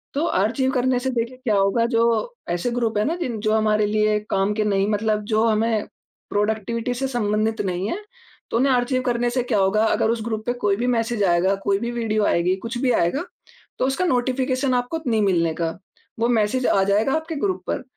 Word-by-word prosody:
तो 295 +4 +1
आर्चीव 250 - +1
करने 255 -1 +1
से 260 +1 -2
देखिए 240 +1 -3
क्या 250 -5 0
होगा 195 +4 +2
जो 230 - +4 0.5
ऐसे 175 +8 -1
ग्रुप 235 -3 -1
है 210 - +2
ना 325 - 0
जिन 250 -11 -3
जो 215 0 +1
हमारे 215 -1 +2
लिए 215 0 +2
काम 195 +2 +1
के 215 - +1
नहीं 200 -1 +1
मतलब 210 0 0
जो 215 +1 +3
हमें 220 0 +1 0.4
प्रोडक्टिविटी 220 +3 -1
से 265 +2 -1
संबंधित 220 -3 0
नहीं 185 +1 -2
है - - -2 0.5
तो - - +1
उन्हें 265 +2 +3
आर्चीव 255 +1 +1
करने 240 -1 0
से 250 0 0
क्या 235 -4 0
होगा 200 +3 +2
अगर 220 - +1
उस 230 -1 -2
ग्रुप 220 -2 -3
पे 245 - 0
कोई 205 -5 0
भी 240 +3 -1
मैसेज़ 230 -3 0
आएगा, 180 +2 +2
कोई 195 0 0
भी 235 +2 -3
वीडियो 220 -3 0
आएगी, 180 0 +2
कुछ 230 +6 -6
भी 255 -1 +2
आएगा 235 - +1 0.6
तो - - +2
उसका 270 +7 0
नोटिफ़िकेशन 255 -1 0
आपको 245 +7 -1
नहीं 225 -2 +2
मिलने 170 -5 +2
का। 165 -1 -1 0.5
वो 230 - +2
मैसेज़ 240 +2 +1
आ 195 - +3
जाएगा 210 +6 +2
आपके 320 +1 -2
ग्रुप 375 +5 -2
पर - - -2
225 Hz, 210 wpm, -22 LUFS, 210-250 Hz, 0.6 s, जो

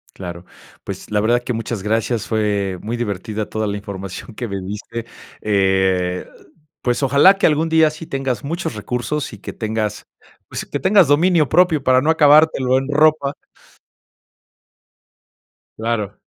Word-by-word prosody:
Claro. 85 -2 -8 0.4
Pues, - - -7
la 105 - +1
verdad 120 +3 +2
que 125 - -3
muchas 115 -2 -4
gracias. 110 +1 -1
Fue 100 -4 -1
muy 115 +3 -3
divertida 105 -1 -4
toda 110 0 -2
la 100 0 -2
información 100 +1 -8
que 120 0 -5
me 100 -1 -4
diste. 105 +4 -6 0.3
Eh, 95 -3 +1 0.6
pues 125 +2 0
ojalá 140 +8 +6
que - - +3
algún 160 +1 +1
día 160 -1 +4
sí 155 +2 -9
tengas 135 -5 -3
muchos 165 -4 -3
recursos 125 +7 -3
y 105 - -10
que - - -8
tengas 110 -2 -3 0.4
pues - - -5
que - - -5
tengas 190 -4 +4
dominio 155 0 +3
propio 175 -5 +3
para 130 0 +4
no 150 +4 +1
acabártelo 150 -4 +4
en 135 +1 -4
ropa. 150 -1 +3 2.4
Claro. 110 -3 -2
115 Hz, 145 wpm, -19 LUFS, 105-145 Hz, 2.4 s, ojalá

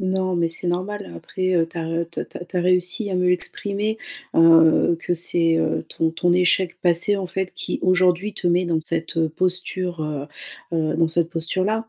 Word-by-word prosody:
Non, 185 -1 -1
mais 170 -1 +1
c'est 170 +2 -4
normal 185 - -3
après, 185 - -2
heu, 165 - +2
tu - - -14
as 165 - -2
re 165 0 -2
te 170 - -6
te - - -7
tu 180 +1 -8
as - - +2
réussi 180 +4 +1
à 185 - -1
mieux 180 0 +3
exprimer, 205 +4 -2 0.4
heu, 165 0 +6
que 175 - -2
c'est, 165 -1 +2
heu, 160 -1 0
ton 165 0 -1
ton 175 +1 +1
échec 180 0 +2
passé 175 +3 +3
en 195 -2 -3
fait 190 +1 -3
qui - - -4
aujourd'hui 185 +2 +2
te 180 - -5
met 175 +1 +3
dans 170 -2 0
cette 165 +1 -3
posture, 180 +1 -2
heu, 145 -2 -4 0.5
heu, 160 -2 0
dans 165 -1 +2
cette 165 0 0
posture-là. 190 +7 -1
175 Hz, 195 wpm, -22 LUFS, 165-185 Hz, 0.5 s, heu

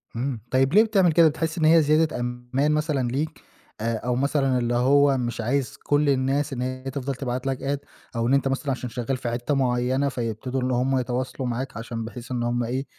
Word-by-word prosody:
امم. 125 0 -2
طيب 135 +3 +2
ليه 215 - +7
بتعمل 195 -6 +3
كده؟ 165 +1 +6
بتحس 160 +2 -2
إن 160 - +2
هي 160 +1 +7
زيادة 155 -1 +2
أمان 125 +4 -1
مثلًا 150 -4 0
ليك 155 +4 -3 0.4
آآ، 115 0 0
أو 120 +2 -2
مثلًا 135 0 +1
اللي 120 -1 0
هو 140 +2 +4
مش 120 -2 -2
عايز 130 +3 -1
كل 145 0 +2
الناس 135 +2 +1
إن 125 - -4
هي 130 0 -4
تفضل 135 0 -3
تبعت 125 0 -3
لك 135 -1 -1
Add 140 +1 -3 0.3
أو 115 0 0
إن 130 - +2
أنت 140 0 +3
مثلًا 135 +1 -1
عشان 130 -1 -4
شغال 125 +2 -2
في 120 -1 -3
حتّة 120 +5 -1
معينة، 130 +1 +1
فيبتدوا 125 +1 -3
إن 130 - 0
هُم 130 +2 +1
يتواصلوا 125 +1 -3
معاك 125 -1 -4
عشان 115 0 -5
بحيث 120 +2 -9
إن 120 -1 -1
هُم 120 0 0
إيه، 130 +4 -2
130 Hz, 215 wpm, -24 LUFS, 125-140 Hz, 0.4 s, ليه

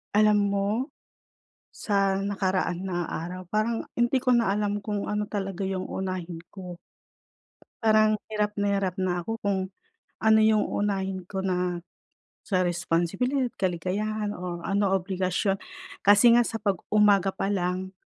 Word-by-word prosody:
Alam 210 0 +5
mo, 200 0 0 1.0
sa 195 -2 0
nakaraan 190 -2 -1
na 175 -3 -2
araw 180 +2 -6
parang 215 +4 -1
hindi 240 +2 +2
ko 250 -1 +3
na 230 -5 +2
alam 205 0 -1
kung 205 -1 -3
ano 210 0 -1
talaga 195 -2 -4
yung 190 -1 -2
uunahin 180 -3 -4
ko. 180 -3 -8 1.1
Parang 215 -1 +4 0.2
hirap 210 -1 -1
na 200 0 +2
hirap 190 -2 -1
na 180 -2 -1
ako 225 0 -4
kung 200 -1 0 0.6
ano 220 0 +4
yung 215 -1 +4
uunahin 195 -2 -1
ko 190 -1 -3
na 180 -1 0 0.7
sa 185 -3 +1
responsibilidad, 180 +10 0
kaligayahan, 205 +4 -2
o 180 -1 -5
ano, 200 0 +1
obligasyon 190 +1 0 0.5
kasi 205 +4 +7
nga 240 - +6
sa 225 - -3
pag 200 -3 +1 0.2
umaga 205 -2 +5
pa - - -3
lang 190 -1 -2
195 Hz, 140 wpm, -26 LUFS, 185-210 Hz, 1.1 s, kasi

